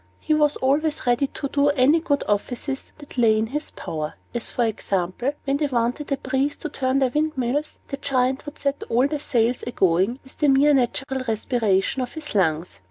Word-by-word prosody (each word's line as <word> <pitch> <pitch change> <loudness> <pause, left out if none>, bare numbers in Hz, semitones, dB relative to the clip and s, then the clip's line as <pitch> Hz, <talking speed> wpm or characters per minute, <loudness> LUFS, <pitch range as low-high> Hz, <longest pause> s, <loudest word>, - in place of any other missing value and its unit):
He - - 0
was 300 -1 +3
always 295 +4 0
ready 245 +3 +2
to 280 - -4
do 280 +1 +1
them 285 - +2
any 280 +6 +5
good 290 -4 0
offices 245 +6 -2
that 290 -3 -8
lay 220 -2 +5
in 220 - +1
his 295 +7 -3
power; 155 -1 -5 0.2
as 240 -2 -2
for 240 - 0
example, 200 +4 -1
when 275 0 +1
they 295 0 0
wanted 250 +3 -1
a 275 - +2
breeze 265 +2 -1
to 310 - -5
turn 260 -2 0
their 265 -2 +2
windmills, 295 -2 -1
the 275 - -3
Giant 265 +1 0
would 295 - -7
set 280 0 -1
all 245 +3 +3
the 295 +1 -1
sails 245 -3 +1
a - - -5
going 190 +2 +2
with 265 - -14
the 295 - +3
mere 280 +2 +5
natural 265 +1 0
respiration 220 0 +1
of 250 - -4
his 315 -2 -6
lungs. 170 -4 0
265 Hz, 205 wpm, -23 LUFS, 235-285 Hz, 0.2 s, any